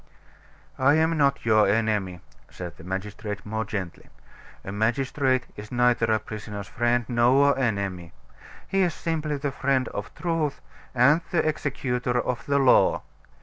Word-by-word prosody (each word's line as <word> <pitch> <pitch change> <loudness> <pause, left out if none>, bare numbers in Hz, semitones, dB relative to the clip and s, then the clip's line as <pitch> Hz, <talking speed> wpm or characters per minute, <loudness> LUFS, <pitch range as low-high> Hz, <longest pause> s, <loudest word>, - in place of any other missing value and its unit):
"I 140 +3 +5
am 160 +1 +2
not 140 -5 +1
your 110 -2 +4
enemy," 105 -4 0 0.3
said 90 -3 -8
the - - -13
magistrate 100 +3 -5
more 110 +1 -2
gently. 95 -6 -6 0.6
"A 95 - -5
magistrate 130 +4 0
is 105 0 -10
neither 125 -2 +2
a 110 - +4
prisoner's 105 -2 -7
friend 120 +2 0
nor 130 +4 +4
enemy, 100 -9 -2 0.6
he 195 - +1
is 175 -4 +1
simply 155 -3 -2
the 140 0 -2
friend 130 -2 0
of 100 - -6
truth 165 -4 -1 0.4
and 140 +7 +5
the 170 -3 +1
executor 125 -5 -1
of 120 -1 -2
the 140 0 +2
law. 135 -2 +4
120 Hz, 145 wpm, -25 LUFS, 105-140 Hz, 0.6 s, I